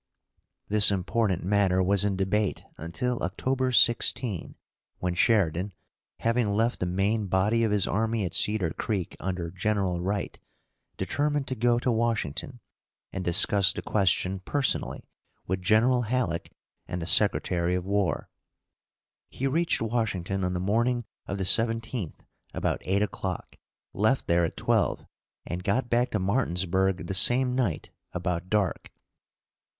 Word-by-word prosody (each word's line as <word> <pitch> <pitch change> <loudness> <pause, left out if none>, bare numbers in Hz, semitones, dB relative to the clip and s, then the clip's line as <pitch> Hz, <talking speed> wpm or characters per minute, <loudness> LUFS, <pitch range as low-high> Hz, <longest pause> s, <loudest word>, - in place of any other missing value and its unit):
This 105 0 +5
important 95 0 0
matter 95 -1 +2
was 100 +1 +2
in 100 -1 0
debate 100 +1 -1
until 100 +10 -3
October 130 +8 -1
16, 120 -2 +2 0.4
when 90 -1 -2
Sheridan, 95 -1 +1 0.5
having 115 -1 +1
left 115 +3 +1
the 90 - -1
main 100 +4 0
body 100 +5 +2
of 110 - +2
his 105 -2 +2
army 110 +1 0
at 85 - -5
Cedar 105 -6 +1
Creek 95 -3 -3
under 90 -2 -3
General 95 -2 -1
Wright, 100 +2 -3 0.6
determined 145 -1 -1
to 130 - -2
go 120 +1 +2
to 125 +1 0
Washington, 115 - -2 0.5
and 95 - -3
discuss 95 +3 +3
the - - -6
question 95 -1 +1
personally 135 +8 -1 0.4
with 95 +1 -2
General 115 +6 +3
Halleck 115 -8 -2 0.4
and 90 - -4
the 80 - -4
Secretary 90 -2 +2
of 90 0 -3
War. 100 -4 0 1.0
He 135 - -4
reached 160 0 +1
Washington 100 -5 -1
on 90 0 -1
the 90 - -2
morning 115 +5 0 0.2
of 100 - -3
the 95 - -2
17th 115 -2 0 0.3
about - - -1
eight 100 +2 +1
o'clock, 95 -2 -5 0.4
left 110 +6 +1
there 85 0 +2
at - - -6
twelve; - - 0 0.4
and 90 +1 -5
got 120 +5 0
back 120 +1 +2
to 110 - -1
Martinsburg 95 -3 0
the 95 - -4
same 125 +6 +4
night 125 - -1 0.2
about 90 0 -3
dark. 105 -3 -1
100 Hz, 140 wpm, -27 LUFS, 90-115 Hz, 1.0 s, This